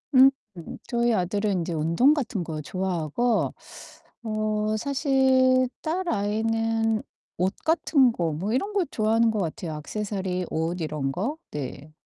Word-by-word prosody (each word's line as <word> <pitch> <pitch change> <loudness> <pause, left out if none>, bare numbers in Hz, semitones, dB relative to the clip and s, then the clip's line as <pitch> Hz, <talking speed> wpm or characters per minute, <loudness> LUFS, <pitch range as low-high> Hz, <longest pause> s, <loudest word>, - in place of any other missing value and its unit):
음 265 +1 +9 0.6
저희 235 -1 +1
아들은 200 0 0
인제 170 0 -3
운동 165 - +3
같은 235 - -2
거 155 -2 -5
좋아하고 185 +6 -1 0.7
어 215 -1 -1
사실 260 -1 +3
딸아이는 225 - 0 0.3
옷 185 +2 0
같은 305 -5 +4
거 170 -7 -1
뭐 195 +9 -2
이런 400 +11 -1
거 385 -4 +2
좋아하는 225 +1 +2
것 215 - -2
같아요 170 -2 -3
악세서리, 185 +2 -3
옷 165 +2 -1
이런 150 -3 -2
거? 235 - -2
네. 145 +1 -6
215 Hz, 245 characters per minute, -25 LUFS, 175-250 Hz, 0.7 s, 음